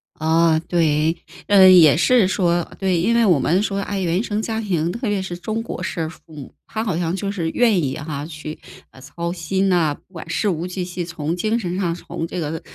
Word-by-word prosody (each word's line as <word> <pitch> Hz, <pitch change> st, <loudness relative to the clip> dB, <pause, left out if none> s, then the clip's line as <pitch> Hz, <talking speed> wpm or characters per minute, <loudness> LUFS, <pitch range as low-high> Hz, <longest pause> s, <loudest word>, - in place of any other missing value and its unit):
啊， 160 Hz, 0 st, +2 dB
对， 160 Hz, -1 st, +1 dB, 0.3 s
呃， 195 Hz, -2 st, +7 dB
也 170 Hz, -6 st, +7 dB
是 220 Hz, +5 st, +4 dB
说 185 Hz, -2 st, +1 dB, 0.2 s
呃， -, -, -14 dB
对， 185 Hz, -3 st, 0 dB
因 230 Hz, +7 st, +2 dB
为 235 Hz, -1 st, +4 dB
我 175 Hz, -8 st, +4 dB
们 175 Hz, +8 st, +2 dB
说， 200 Hz, -2 st, -2 dB
哎， 200 Hz, 0 st, -3 dB
原 175 Hz, +1 st, 0 dB
生 215 Hz, -2 st, -2 dB
家 220 Hz, 0 st, -3 dB
庭， 175 Hz, -6 st, -1 dB
特 235 Hz, +5 st, -4 dB
别 205 Hz, -2 st, 0 dB
是 175 Hz, -2 st, -5 dB
中 220 Hz, +4 st, -3 dB
国 -, -, -6 dB
式 160 Hz, -2 st, -3 dB
父 175 Hz, -, -14 dB
母， 145 Hz, -3 st, -10 dB
他 220 Hz, -, -3 dB
好 195 Hz, -8 st, -1 dB
像 170 Hz, 0 st, -1 dB
就 195 Hz, +1 st, -3 dB
是 170 Hz, -5 st, -2 dB
愿 225 Hz, -7 st, +3 dB
意 135 Hz, -2 st, -2 dB
哈， 145 Hz, -1 st, -5 dB
去， 155 Hz, -1 st, -8 dB, 0.3 s
呃， 130 Hz, -, -16 dB
操 170 Hz, +6 st, -5 dB
心 190 Hz, +3 st, -1 dB
啊， 165 Hz, -5 st, +2 dB
不 185 Hz, -, -19 dB
管 165 Hz, -1 st, -9 dB
事 205 Hz, +5 st, 0 dB
无 170 Hz, 0 st, -2 dB
巨 185 Hz, 0 st, -4 dB
细， 175 Hz, -1 st, -5 dB
从 165 Hz, -1 st, -3 dB
精 220 Hz, +5 st, 0 dB
神 180 Hz, -5 st, -3 dB
上， 170 Hz, -4 st, -1 dB
从 165 Hz, -1 st, -6 dB
这 180 Hz, -, -5 dB
个， 160 Hz, 0 st, -4 dB
175 Hz, 245 characters per minute, -21 LUFS, 160-195 Hz, 0.3 s, 呃